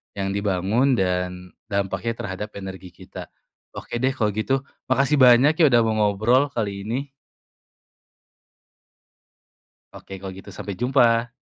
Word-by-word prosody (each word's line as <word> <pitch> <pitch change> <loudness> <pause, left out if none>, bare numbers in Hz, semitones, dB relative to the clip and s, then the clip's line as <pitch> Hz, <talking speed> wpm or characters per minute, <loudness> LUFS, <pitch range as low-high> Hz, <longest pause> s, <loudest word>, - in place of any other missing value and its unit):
yang 95 -1 -2
dibangun, 100 +6 +1
dan 90 -2 -2 0.2
dampaknya 100 +3 -2
terhadap 100 0 -6
energi 95 -2 -9
kita. - - -10 0.5
Oke 120 - -5
deh 130 +2 0
kalau 110 -5 0
gitu, 130 +6 -1 0.2
makasih 135 +3 +2
banyak 125 +2 +7
ya, - - +5
udah 120 -4 +4
mau 110 -1 0
ngobrol, 110 +7 +2
kali 115 -7 -3 0.2
ini. 135 +5 -3 2.8
Oke, 95 -1 -10
kalau 95 -1 -7
gitu 95 - -11
sampai 100 0 -7
jumpa. 120 -2 +2
110 Hz, 125 wpm, -23 LUFS, 95-125 Hz, 2.8 s, banyak